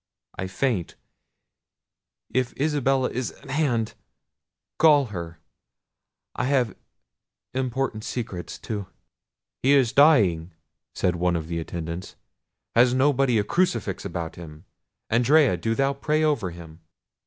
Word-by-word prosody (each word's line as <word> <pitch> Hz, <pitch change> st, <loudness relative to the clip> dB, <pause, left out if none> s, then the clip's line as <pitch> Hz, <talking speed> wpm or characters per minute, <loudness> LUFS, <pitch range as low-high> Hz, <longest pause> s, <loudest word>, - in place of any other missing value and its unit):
I 95 Hz, -, -4 dB
faint. 95 Hz, -2 st, -1 dB, 1.4 s
If 130 Hz, 0 st, -1 dB
Isabella 135 Hz, -3 st, +1 dB
is 125 Hz, +1 st, -3 dB
at -, -, -12 dB
hand—call 145 Hz, +2 st, 0 dB
her—I 85 Hz, +3 st, -10 dB
have 130 Hz, -5 st, +1 dB, 0.8 s
important 130 Hz, -3 st, -2 dB
secrets 110 Hz, -9 st, -5 dB
to—" 105 Hz, -4 st, -5 dB, 0.7 s
"He 135 Hz, +3 st, +4 dB
is 130 Hz, -4 st, +3 dB
dying!" 95 Hz, -, +4 dB, 0.4 s
said 90 Hz, -1 st, 0 dB
one 90 Hz, 0 st, +1 dB
of 80 Hz, -2 st, -3 dB
the 85 Hz, 0 st, -3 dB
attendants; 85 Hz, +1 st, -6 dB, 0.6 s
"has 120 Hz, +1 st, +4 dB
nobody 135 Hz, -2 st, +3 dB
a 105 Hz, -, +2 dB
crucifix 120 Hz, -, 0 dB
about 85 Hz, -2 st, -4 dB
them? 80 Hz, 0 st, -11 dB, 0.5 s
Andrea, 130 Hz, -, +4 dB
do 115 Hz, +6 st, -1 dB
thou 135 Hz, +2 st, +1 dB
pray 150 Hz, +3 st, 0 dB
over 145 Hz, -12 st, +1 dB
him." 85 Hz, -2 st, -11 dB
115 Hz, 110 wpm, -25 LUFS, 90-135 Hz, 1.4 s, He